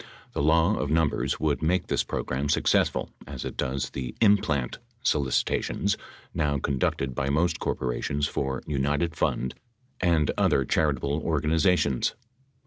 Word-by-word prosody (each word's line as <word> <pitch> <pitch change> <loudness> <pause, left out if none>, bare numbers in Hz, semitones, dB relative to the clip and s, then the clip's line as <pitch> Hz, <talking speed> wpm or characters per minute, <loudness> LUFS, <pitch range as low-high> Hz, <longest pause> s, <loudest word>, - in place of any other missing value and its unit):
The - - -1
law 80 +7 +3
of 75 - -2
num 80 -1 +3
bers - - -2
would 75 -2 0
make 85 +3 +1
this - - 0
program 70 +3 -2
successful - - +2 0.2
as 65 -2 -6
it - - -5
does 65 +1 -2
the 65 -2 -5
"in 105 -2 +6
plant" 70 -9 -2 0.2
solicitations 70 - +1 0.4
now 75 -2 +1
conducted 70 -1 -1
by 70 +2 -1
most 80 +5 +1
corporations 70 +3 -1
for 65 -2 -2
united 75 +3 0
Fund 65 -5 0 0.5
and 85 -5 +3
other 70 - +3
charitable 70 0 +1
organizations. 80 -2 +2
75 Hz, 135 wpm, -27 LUFS, 65-80 Hz, 0.5 s, in